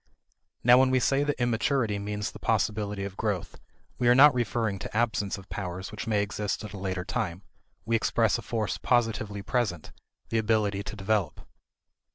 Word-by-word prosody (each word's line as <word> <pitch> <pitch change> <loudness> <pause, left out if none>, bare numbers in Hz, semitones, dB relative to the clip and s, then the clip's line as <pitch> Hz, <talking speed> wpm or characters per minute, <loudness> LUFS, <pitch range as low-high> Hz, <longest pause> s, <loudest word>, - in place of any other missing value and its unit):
Now 125 +1 +7
when 130 0 +4
we 130 0 +3
say 135 +3 +2
that 145 -3 -2
immaturity 120 -2 +1
means 105 0 -3
the - - -11
possibility 105 -1 0
of 100 -1 -6
growth, 100 -5 -3 0.4
we 120 - +2
are 120 - +6
not 145 +2 +8
referring 110 -4 -1
to 105 - -5
absence 110 -4 0
of 95 0 -12
powers 95 -1 -5
which 110 +2 -6
may 105 -2 +2
exist 105 +1 -3
at 105 -1 -8
a - - -6
later 95 -2 -3
time; 90 +2 -3 0.4
we 115 +1 +1
express 110 - +1
a - - -6
force 110 -3 -2
positively 110 -4 0
present 105 - -1 0.4
the 115 - +1
ability 105 -2 +1
to 100 - -7
develop. 105 -1 -1
105 Hz, 180 wpm, -28 LUFS, 100-120 Hz, 0.4 s, not